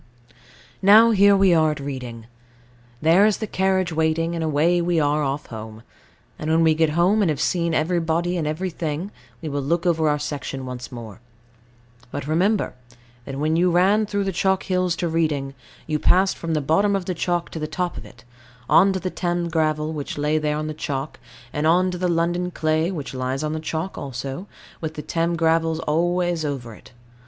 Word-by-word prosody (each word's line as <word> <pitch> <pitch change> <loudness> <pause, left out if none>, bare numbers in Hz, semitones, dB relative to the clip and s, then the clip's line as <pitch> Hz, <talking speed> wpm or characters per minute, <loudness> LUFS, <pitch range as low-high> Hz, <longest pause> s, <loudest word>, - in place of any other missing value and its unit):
Now 215 +4 +7
here 200 -1 +5
we 195 -2 +5
are 160 -1 +4
at 150 - -3
Reading. 125 -5 -6 0.8
There 165 +5 +5
is 215 - +1
the 220 - -3
carriage 190 -3 0
waiting, 160 +1 0
and 165 -1 -2
away 160 +3 +2
we 170 -1 +1
are 150 0 +1
off 140 0 -2
home; 110 -1 -9 0.6
and 155 - -3
when 165 +1 +3
we 160 -1 +5
get 160 0 +2
home, 190 +5 +3
and 190 - +2
have 150 -3 -1
seen 170 0 0
everybody 170 +1 0
and 160 -4 -1
everything, 165 +1 -3 0.3
we 155 - -3
will 145 0 -2
look 165 +6 -1
over 160 -3 +2
our 150 - +1
section 145 -2 -5
once 125 +1 -7
more. 115 -4 -9 0.9
But 145 +1 -5
remember, 185 +7 +1 0.5
that 135 -1 -6
when 155 +3 0
you 180 +2 +3
ran 195 +5 +3
through 200 -1 -1
the 195 - -1
chalk 190 +1 +1
hills 185 -2 0
to 175 - -2
Reading, 155 -4 -1 0.3
you 155 -1 -1
passed 190 +4 +3
from 165 -1 -3
the 155 - +1
bottom 200 +8 +2
of 195 -2 -2
the 185 - -2
chalk 175 0 -2
to 160 - -5
the 155 - -3
top 175 +3 -3
of - - -7
it, 120 - -16 0.4
on 195 +1 +5
to 190 - -2
the 185 +1 -4
Thames 175 -1 -2
gravels, 155 -1 0
which 145 -2 -5
lie 150 +1 +1
there 150 -1 -1
on 155 - -3
the 155 - -4
chalk, 145 -2 -4 0.3
and 150 +1 0
on 180 +3 +3
to 180 - -5
the 180 - +1
London 175 +1 0
clay, 160 0 0
which 150 -8 -5
lies 130 +2 -2
on 155 0 -2
the 160 - -3
chalk 160 +3 -4
also, 135 - -6 0.3
with 160 -1 -4
the 150 - -6
Thames 170 0 -1
gravels 165 -1 +2
always 175 +1 0
over 135 -6 -4
it. - - -16
160 Hz, 200 wpm, -22 LUFS, 150-180 Hz, 0.9 s, Now